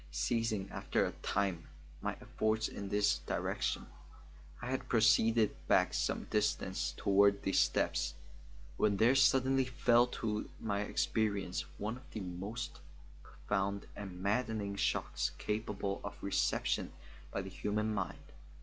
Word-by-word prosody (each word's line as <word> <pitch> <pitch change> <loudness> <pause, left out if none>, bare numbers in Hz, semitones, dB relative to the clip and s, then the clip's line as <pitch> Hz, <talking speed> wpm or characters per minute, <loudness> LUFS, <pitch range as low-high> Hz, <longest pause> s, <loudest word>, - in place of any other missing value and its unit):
Ceasing 100 +8 0
after - - 0
a - - -2
time 95 -5 -1 0.3
my - - -1
efforts 110 +1 0
in 100 -1 -6
this 105 0 +2
direction, - - -1 0.7
I 125 +1 -4
had 130 - -3
proceeded 115 -1 +4
back - - +4
some - - 0
distance - - 0
toward 100 0 +4
the 95 - 0
steps, - - +2 0.6
when 105 -2 +2
there 115 +5 +5
suddenly 135 0 +4
fell 125 -1 +4
to 105 -3 -3
my 100 -2 -1
experience 100 -6 0
one 110 +4 -3
of 135 +2 -16
the - - -3
most 100 +8 -5 0.4
profound 100 +3 -2
and 95 -3 -7
maddening 105 0 0
shocks - - 0
capable 105 -2 -2
of 100 - -7
reception 100 - 0 0.4
by 95 - -3
the 95 - -7
human 105 +3 -1
mind. 95 -6 -4
105 Hz, 130 wpm, -34 LUFS, 100-115 Hz, 0.7 s, there